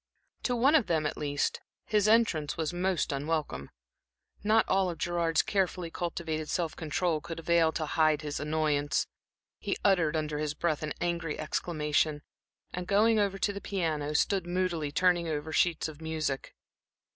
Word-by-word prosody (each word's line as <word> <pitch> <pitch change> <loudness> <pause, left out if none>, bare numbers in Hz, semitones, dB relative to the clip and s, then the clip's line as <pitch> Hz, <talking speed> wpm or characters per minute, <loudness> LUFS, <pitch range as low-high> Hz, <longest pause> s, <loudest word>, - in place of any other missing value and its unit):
To 245 - 0
one 260 +5 +4
of 300 -8 +4
them, 160 -2 +1
at 150 - -1
least, 145 -1 -1 0.2
his 210 -1 +2
entrance 215 -10 +2
was 160 0 -1
most 180 -3 0
unwelcome. 145 - -2 0.7
Not 220 +1 +3
all 190 -1 +2
of 170 - -5
Gerard's 170 -1 +1
carefully 180 -4 -1
cultivated 160 -3 -3
self 170 -3 -1
control 160 0 -1
could 165 +2 -7
avail 165 -1 +3
to 155 - -2
hide 155 -1 +2
his 145 -1 -3
annoyance; 150 -1 0 0.5
he - - -2
uttered 170 -6 +3
under 150 -1 -2
his 150 -1 -2
breath 155 -2 0
an 155 -1 -3
angry 170 -3 -2
exclamation, 150 -1 0 0.5
and 180 0 -4
going 215 +3 +4
over 200 -1 +1
to 205 +1 0
the 200 - -6
piano, 155 -6 -2
stood 190 +2 +1
moodily 175 -4 -1
turning 175 +1 +2
over 155 0 -3
sheets 170 -2 +2
of 155 0 -10
music. 155 -4 -3
165 Hz, 160 wpm, -30 LUFS, 150-180 Hz, 0.7 s, one